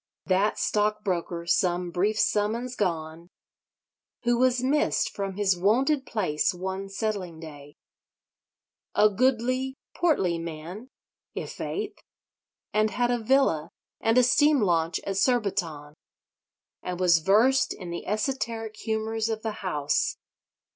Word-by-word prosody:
That 195 +2 +2
stockbroker, 200 -5 -1
some 175 -1 +1
brief 205 +5 0
summers 225 +5 0
gone, 165 -3 -3 0.9
who 240 0 +2
was 255 -1 +2
missed 290 +3 +1
from 195 -1 -4
his 195 -2 +2
wonted 260 - +2
place 180 -6 0
one 190 +2 -4
settling 195 -5 -3
day! 145 -3 -11 1.2
a 215 - +6
goodly 255 +3 +1 0.2
portly 195 - +1
man, 170 +8 -7 0.5
i' - - -2
faith: 415 0 -5 0.7
and 215 0 +3
had 245 +4 0
a 245 - +1
villa 220 - +2 0.3
and 225 +2 +2
a 250 - +7
steam 290 +4 +4
launch 165 -4 +1
at 195 -1 -3
Surbiton: 185 - 0 0.9
and 180 -1 -5
was 175 -3 +5
versed 220 +10 +3
in 180 -3 -6
the 170 - -6
esoteric 225 0 -2
humours 220 0 -2
of 220 -1 -3
the 220 - -1
House. 150 -6 0
210 Hz, 120 wpm, -26 LUFS, 175-240 Hz, 1.2 s, a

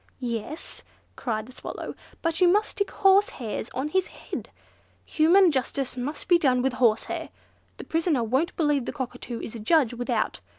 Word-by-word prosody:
"Yes," 245 +5 -5 0.3
cried 220 -3 -2
the 255 - -13
Swallow, - - -7 0.3
"but 330 +2 0
you 360 - +7
must 415 +4 +3
stick 405 - -1
horsehairs 385 - +2
on 265 +4 -1
his 375 +2 +1
head. - - -7 0.6
Human 345 +3 +5
justice 265 -1 -1
must 265 +5 -5
be 350 -2 +5
done 255 -5 +3
with 265 -1 +1
horsehair. 235 -3 +1 0.5
The - - -7
prisoner 320 -6 +1
won't 260 +9 0
believe 295 -5 +2
the - - -4
Cockatoo 250 -3 -5
is - - -6
a 230 - -6
judge 250 +2 +3
without. 245 0 -1
270 Hz, 165 wpm, -26 LUFS, 245-335 Hz, 0.6 s, you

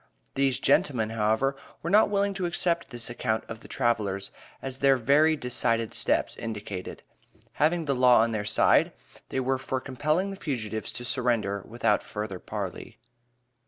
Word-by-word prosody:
These 135 -1 +1
"gentlemen," 115 -6 +2
however, 115 +5 +1 0.3
were 170 - -2
not 210 +1 +5
willing 200 0 +1
to 190 -2 -2
accept 170 0 0
this 120 -3 -4
account 115 -2 -2
of 115 - -7
the - - -14
travelers, 105 -6 -1 0.3
as 135 0 -6
their 135 -1 +4
very 145 +6 +4
decided 115 -4 0
steps - - 0
indicated. 105 -4 -6 0.6
Having 165 +2 +2
the 140 - +1
law 125 -3 +5
on 115 +1 +1
their 110 -2 -2
side, 110 +2 +4 0.4
they - - -2
were 130 0 0
for 130 0 -2
compelling 155 +9 -1
the 195 - -7
fugitives 110 -7 -3
to 120 - -5
surrender 115 -6 0
without 115 -2 +1
further 105 -3 -5
parley. - - -6
125 Hz, 160 wpm, -27 LUFS, 110-140 Hz, 0.6 s, not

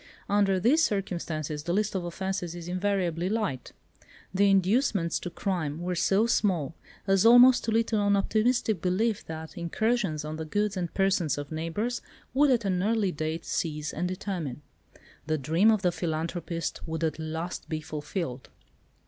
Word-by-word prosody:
Under 200 -2 +2
these 280 - +4
circumstances 170 - -2
the 170 +3 -2
list 210 +2 +1
of 190 -2 -2
offences 180 0 -3
is 175 -1 -8
invariably 180 -2 0
light. 205 - -2 0.6
The 200 +1 +4
inducements 195 -2 +2
to 175 - -5
crime 170 -5 -2
were 180 +1 -2
so 195 +5 +2
small, 185 - +1 0.3
as 195 -1 +3
almost 245 +2 +7
to 225 - 0
lead 225 +1 +3
to 215 -2 +1
an 205 0 +3
optimistic 215 -1 +1
belief 195 +5 0
that 160 0 -7
incursions 180 -3 0
on 155 +1 -5
the 160 - -4
goods 205 +5 -1
and 175 -3 -3
persons 195 -6 +1
of 145 0 -6
neighbours 165 +10 -2 0.3
would 285 +2 +4
at 235 -4 +2
an 185 -2 +1
early 210 -1 +1
date 155 +1 -3
cease 150 -2 -2
and 175 +3 -1
determine. 180 -7 -4 0.6
The 155 0 +1
dream 165 +9 +3
of 215 -3 +2
the 180 - +3
philanthropist 165 0 -3
would 160 0 -3
at 160 0 -1
last 160 +2 -5
be 155 -2 -2
fulfilled. 150 -4 -5
180 Hz, 165 wpm, -28 LUFS, 160-205 Hz, 0.6 s, almost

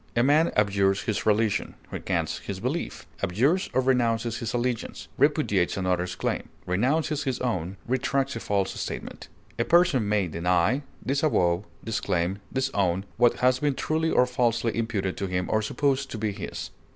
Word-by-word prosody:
A 120 - +4
man 150 +5 +4
abjures 100 -1 +2
his 110 -1 -2
religion, 110 0 +1 0.2
recants - - -2
his - - -6
belief, - - -3 0.2
abjures 135 - +1
or 130 - +2
renounces 120 -3 +1
his 115 - -3
allegiance, 120 -1 -2
repudiates 140 - +2
another's 90 -1 0
claim, - - -2 0.2
renounces 140 - 0
his 130 -2 -1
own, 95 -7 -2
retracts 135 +2 0
a - - -3
false 100 -3 0
statement. - - -6 0.3
A - - +4
person 170 - +3
may 105 -3 +2
deny, 90 - +1 0.2
disavow, 110 - +2 0.2
disclaim, 95 -4 -1
disown 100 -9 0
what 120 0 +3
has 130 0 +4
been 145 -1 +1
truly 160 +3 0
or 125 - +4
falsely 120 -2 0
imputed 105 -5 -1
to 100 - -2
him 90 0 -1
or 110 - +2
supposed 135 +4 0
to - - -5
be 110 -1 -1
his. 100 - -6
115 Hz, 155 wpm, -26 LUFS, 95-130 Hz, 0.3 s, A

